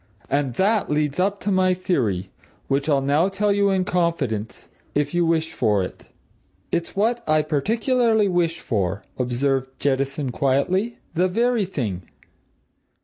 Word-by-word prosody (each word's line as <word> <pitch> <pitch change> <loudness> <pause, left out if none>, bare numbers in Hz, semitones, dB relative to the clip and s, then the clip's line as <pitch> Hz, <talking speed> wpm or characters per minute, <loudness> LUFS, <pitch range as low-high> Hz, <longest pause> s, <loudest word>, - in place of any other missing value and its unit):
And 140 -3 0
that 205 - +2
leads 150 +1 0
up 200 +2 +1
to 205 - -1
my 185 -1 +3
theory 110 - -1 0.4
which 140 +2 0
I'll 140 -2 +3
now 150 +7 +2
tell 200 +1 +1
you 200 0 +2
in 190 -1 +1
confidence 165 - -1 0.3
if 145 +1 0
you 175 -1 +2
wish 160 -1 0
for 105 -5 +1
it." 90 - -8 0.7
"It's 170 0 -2
what 230 +4 +1
I 155 0 +4
particularly 220 - +2
wish 170 -3 0
for," 100 - -1 0.2
observed 130 +1 -1
Jettison 140 0 0
quietly. 180 - 0 0.2
"The 180 +3 +2
very 230 +2 +1
thing!" 110 - -3
160 Hz, 145 wpm, -23 LUFS, 135-195 Hz, 0.7 s, I